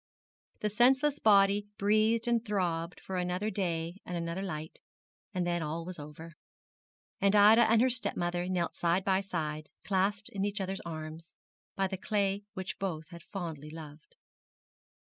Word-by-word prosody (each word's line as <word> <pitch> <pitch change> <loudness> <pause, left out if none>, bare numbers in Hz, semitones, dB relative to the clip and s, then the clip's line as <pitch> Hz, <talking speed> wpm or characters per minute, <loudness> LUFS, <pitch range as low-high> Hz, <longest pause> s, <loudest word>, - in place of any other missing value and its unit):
The 210 - 0
senseless 265 +6 +4
body 200 -1 +5
breathed 215 +3 +3
and 235 -1 +2
throbbed 180 -5 -1
for 190 - -5
another 180 +4 -1
day 170 -3 -2
and 180 - -4
another 170 +2 -3
light: 160 -5 -5 0.5
and 180 -3 -1
then 175 -1 0
all 160 +2 -3
was 180 -2 -7
over 150 +3 -9 0.9
and 200 +1 +3
Ida 215 +3 +7
and 230 +1 +5
her 260 - +4
stepmother 175 -6 -1
knelt 175 -2 -1
side 175 +2 +1
by 190 -1 +3
side, 155 -5 -4
clasped 200 +1 0
in 195 -1 -3
each 205 +1 -1
other's 190 0 -3
arms, 160 0 -7 0.4
by 195 - +1
the 190 0 -4
clay 200 0 0
which 185 0 -5
both 165 -6 -3
had 170 -2 -10
fondly 160 -6 -6
loved. 155 -1 -11
185 Hz, 155 wpm, -31 LUFS, 165-205 Hz, 0.9 s, Ida